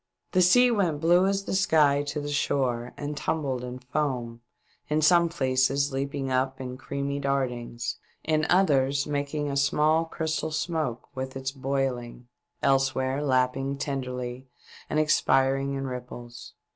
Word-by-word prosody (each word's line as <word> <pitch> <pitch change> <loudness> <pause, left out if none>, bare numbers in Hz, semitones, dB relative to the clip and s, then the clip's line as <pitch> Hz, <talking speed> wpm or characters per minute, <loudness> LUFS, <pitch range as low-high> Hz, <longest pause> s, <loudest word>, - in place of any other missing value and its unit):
The 185 - +3
sea 245 +8 +6
went 180 -9 +1
blue 175 +4 +4
as 195 0 0
the - - -3
sky 155 -7 +4
to 145 +1 -2
the 145 0 -4
shore 125 -4 0
and 145 0 -4
tumbled 145 -4 -2
into 125 0 -7
foam, 125 -4 -2 0.5
in 155 +1 +1
some 170 +1 +5
places 135 -2 +1
leaping 135 0 -2
up 130 +1 0
in 125 -1 -5
creamy 140 +2 -3
dartlngs, 125 -4 -2 0.3
in 155 0 +1
others 140 -7 +3
making 145 0 -2
a - - -3
small 150 +4 +2
crystal 160 -1 -2
smoke 155 -6 -2
with 130 0 -5
its 135 0 -3
boiling, 130 -3 -3 0.4
elsewhere 135 0 +1
lapping 135 0 +1
tenderly 125 -2 -4 0.4
and 155 - +1
ex 155 0 +3
piring 135 +1 +2
in 135 - -3
ripples. 125 -2 -8
140 Hz, 145 wpm, -27 LUFS, 130-150 Hz, 0.5 s, sea